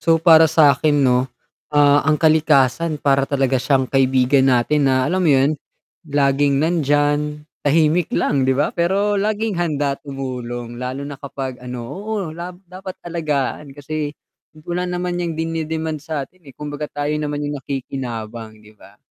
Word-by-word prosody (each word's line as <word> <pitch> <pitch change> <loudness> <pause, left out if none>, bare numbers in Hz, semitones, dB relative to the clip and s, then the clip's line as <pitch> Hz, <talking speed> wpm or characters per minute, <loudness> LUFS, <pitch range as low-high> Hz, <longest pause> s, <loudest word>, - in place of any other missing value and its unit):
So 165 -1 +3
para 160 -1 +6
sa 155 -2 +5
'kin 145 -2 +3
'no, 125 0 +2 0.4
ah 145 -1 +4
ang 155 - +4
kalikasan 155 -1 +3
para 140 -1 +1
talaga 135 -2 +1
siyang 130 0 +2
kaibigan 130 0 +3
natin 135 +3 +2
na 130 -1 +2
alam 180 +7 0
mo 175 - +2
yun, 140 +1 +4 0.6
laging 140 -1 +2
nandyan 150 -1 +1 0.2
tahimik 155 +3 +2
lang 135 -2 0
'di 130 - +2
ba? 145 - +1
Pero 195 +4 +1
laging 210 -2 -1
handa 145 -4 -1
tumulong, 125 -4 -6
lalo 130 +2 -4
na 140 -1 -8
kapag 135 -3 -6
ano, 125 -1 -6
oo 200 - -4
la 170 +2 -6 0.2
dapat 185 +1 -9
alagaan 150 -4 -3
kasi 150 +1 -4 0.5
wala 180 +1 -2
naman 180 0 -2
niyang 170 -2 -3
dininidemand 160 -1 -3
sa 150 -2 -4
'tin 175 0 -22
eh, 130 - -15
kumbaga 150 0 -5
tayo 145 +1 -3
naman 145 -1 -3
yung 145 -1 -4
nakikinabang 120 -5 -6
'di 105 0 -18
ba? - - -17
145 Hz, 155 wpm, -20 LUFS, 135-160 Hz, 0.6 s, para